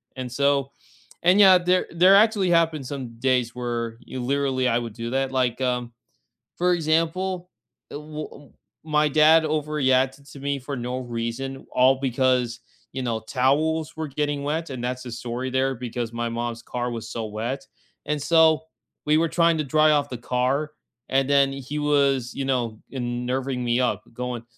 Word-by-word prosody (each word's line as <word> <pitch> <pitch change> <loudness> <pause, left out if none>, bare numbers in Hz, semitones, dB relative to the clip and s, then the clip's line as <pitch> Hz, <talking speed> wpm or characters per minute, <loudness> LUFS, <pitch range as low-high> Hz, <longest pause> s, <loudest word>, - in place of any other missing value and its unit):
And 130 -2 -6
so 140 +1 +1 0.5
and 180 +4 +5
yeah, 190 -2 +8
there 180 +1 +2
there 180 +3 +6
actually 205 -2 +4
happened 165 -5 +2
some 125 -5 -7
days 125 -2 +1
where 120 -2 -3
y - - -7
literally 130 0 0
I 115 - +2
would 115 -2 -6
do 115 +1 -5
that. 135 0 0
Like, 130 -1 0
um, 125 -2 -1 0.6
for 180 +1 +2
example, 175 +3 -1 0.4
eh - - -10
w 150 +1 -6
w 145 -1 -15 0.3
my 150 -1 +2
dad 155 +2 +6
overreacted 140 -3 0
to - - -11
me 140 0 -1
for 140 +2 -5
no 125 +1 -3
reason, 120 +2 -5
all 130 +1 +4
because, 125 -2 +1 0.3
you 130 - -4
know, 115 -3 -1
towels 150 +7 0
were 160 0 -3
getting 145 0 -2
wet. 160 +2 -2
And 130 -2 -5
that's 125 +1 -3
the 125 - -7
story 120 +2 -4
there 130 +1 +1
because 120 -1 -5
my 120 0 -2
mom's 115 0 -4
car 125 +1 -3
was 115 -1 -6
so 115 -1 -4
wet. 120 +6 -4 0.4
And 150 0 -1
so 160 -1 +4 0.4
we 150 +1 +4
were 165 +1 +2
trying 170 -1 +2
to 155 - -1
dry 155 +2 +4
off 145 -1 +1
the 125 - -5
car, 130 +5 -1 0.4
and 135 0 +1
then 140 -1 +4
he 135 +2 -5
was, 140 -4 +2
you 140 - -2
know, 120 -5 -1
nerving 125 +1 -3
me 120 +1 +1
up 110 -5 0
going, 125 0 -5
135 Hz, 175 wpm, -24 LUFS, 125-150 Hz, 0.6 s, yeah